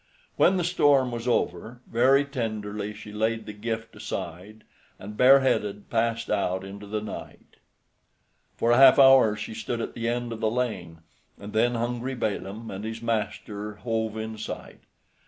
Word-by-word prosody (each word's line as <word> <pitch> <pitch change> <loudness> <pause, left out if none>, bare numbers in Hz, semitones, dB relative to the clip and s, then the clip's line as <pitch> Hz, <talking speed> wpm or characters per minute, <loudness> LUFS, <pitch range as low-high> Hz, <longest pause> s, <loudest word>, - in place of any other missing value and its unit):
When 190 - +4
the 180 - 0
storm 145 -7 +3
was 120 0 -5
over, 115 +1 -1
very 135 +5 +3
tenderly 105 -6 -4
she 105 0 -10
laid 110 +2 -1
the 105 - -7
gift 115 +2 -5
aside, 110 +1 -7 0.3
and 105 +2 -9
bareheaded 125 -6 +3
passed 115 0 0
out 95 -2 0
into 100 +1 -9
the 105 +1 -3
night. 110 - -9 1.0
For 115 - +2
a 120 - +5
half 135 -1 +8
hour 135 -6 +7
she 110 +1 -6
stood 115 +2 -4
at - - -4
the 115 0 -2
end 120 0 -2
of 110 - -7
the 110 -1 +1
lane, 95 -9 -3 0.4
and 100 +1 -9
then 120 +2 +2
hungry 120 +3 -2
Balaam 110 -1 -4
and 95 +1 -6
his 115 +1 -6
master 105 -2 -3
hove 110 0 -2
in 110 0 -5
sight. - - -7
115 Hz, 160 wpm, -26 LUFS, 105-120 Hz, 1.0 s, half